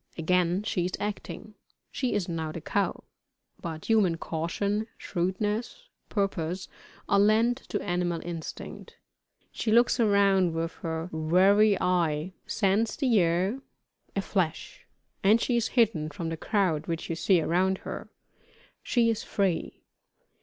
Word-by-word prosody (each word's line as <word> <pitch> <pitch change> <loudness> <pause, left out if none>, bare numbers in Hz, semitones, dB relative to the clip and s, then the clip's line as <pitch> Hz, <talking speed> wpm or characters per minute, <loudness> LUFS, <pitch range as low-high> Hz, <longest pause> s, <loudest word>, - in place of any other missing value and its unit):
Again 180 +3 +1
she 210 -4 -1
is 180 - -3
acting 210 +1 -5 0.4
she 255 -3 -1
is 200 -4 -1
now 160 -2 -3
the 170 - -6
cow; 200 +5 -1 0.6
but 160 -2 -6
human 205 -7 +3
caution, 200 +7 -2
shrewdness, 210 - -2 0.2
purpose, 185 -3 -2 0.4
are 200 - +3
lent 220 +4 +4
to - - -1
animal 175 -1 -1
instinct. 170 -2 -7 0.5
She 220 - -2
looks 240 +2 +4
around 200 -5 +3
her 165 0 -3
with - - -17
wary 190 +6 +4
eye 170 -1 0
scents 210 +2 +1
the 250 -7 +3
air 180 +8 +1 0.5
a 195 - 0
flash, 175 -6 -2 0.4
and 210 +4 +5
she 245 - 0
is 235 -1 +1
hidden 185 -10 +3
from 165 +2 -5
the 165 - -2
crowd 180 -6 0
which 165 -1 -3
you 165 - -2
see 180 +2 +3
around 185 +4 +1
her - - -6 0.7
she 235 -2 +2
is 220 - -2
free! 190 -5 -2
190 Hz, 135 wpm, -28 LUFS, 165-210 Hz, 0.7 s, and